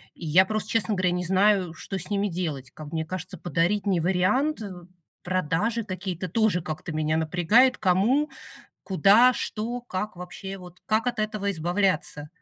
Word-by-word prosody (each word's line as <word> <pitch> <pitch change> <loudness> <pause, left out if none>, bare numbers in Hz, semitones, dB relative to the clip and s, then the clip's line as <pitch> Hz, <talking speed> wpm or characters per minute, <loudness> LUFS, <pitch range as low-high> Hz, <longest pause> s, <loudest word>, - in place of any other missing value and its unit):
И 170 - -9
я 185 +5 +5
просто, 215 +1 -3
честно 225 -2 +1
говоря, 185 -1 +1
не 180 0 -2
знаю, 190 -1 +3
что 190 +3 -6
с 175 - -7
ними 205 0 0
делать. 155 -7 -4
Как 155 -1 -10
мне 160 0 -1
кажется, 185 +2 -5
подарить- 175 +5 0
не 185 -3 +2
вариант, 210 - +1
э. 205 -3 -6 0.5
Продажи 185 +6 0
какие-то- 185 -2 -5
тоже 215 -2 +2
как-то 155 -1 -6
меня 155 +1 0
напрягает. 180 +11 +3
Кому? 215 - +2 0.6
Куда? 200 +7 +5
Что? 235 +3 -3
Как 210 -3 -4
вообще? 190 +2 -7
Вот 180 0 -13
как 220 +3 +1
от 240 - -4
этого 215 -2 -1
избавляться? 175 -3 -1
185 Hz, 165 wpm, -26 LUFS, 175-215 Hz, 0.6 s, я